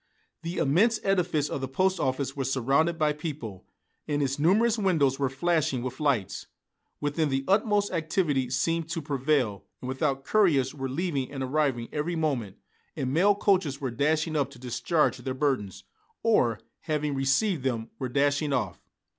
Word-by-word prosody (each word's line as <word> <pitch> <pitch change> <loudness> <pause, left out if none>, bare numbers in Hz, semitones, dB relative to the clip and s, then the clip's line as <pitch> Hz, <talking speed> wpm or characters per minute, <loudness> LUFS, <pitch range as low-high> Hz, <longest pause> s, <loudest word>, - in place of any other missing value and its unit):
The 170 +2 -5
immense 210 +11 +3
edifice 180 -6 +1
of 140 - -4
the 135 - -2
post 185 +8 +1
office 130 +1 -1
was 135 -2 -2
surrounded 140 +6 +2
by 155 -2 +2
people, 140 - -7 0.4
and 145 -1 0
its 135 +1 -1
numerous 215 +8 +3
windows 155 -9 +2
were 135 -2 +1
flashing 150 -2 0
with 130 0 -5
lights. 135 -10 0 0.5
Within 145 +1 0
the 135 0 -1
utmost 205 0 +2
activity 160 -6 0
seemed 165 +6 0
to 170 -1 -2
prevail, 135 - 0 0.2
and 125 - -7
without 135 +1 -1
couriers 150 -12 +3
were 135 -2 -4
leaving 140 -2 -2
and 135 -2 -4
arriving 130 -3 0
every 155 +3 -2
moment, 135 - -1 0.4
and 130 0 -2
mail 195 +6 +4
coaches 185 -9 +1
were 135 -4 -3
dashing 155 +5 0
up 140 -2 +1
to 140 - -14
discharge 125 +4 0
their 130 +1 -4
burdens, 130 -9 -1 0.4
or, 120 - +3 0.2
having 150 -2 -2
received 140 +6 +1
them, 120 -4 -2
were 130 - -3
dashing 145 +3 +1
off. - - -1
145 Hz, 165 wpm, -27 LUFS, 130-165 Hz, 0.5 s, mail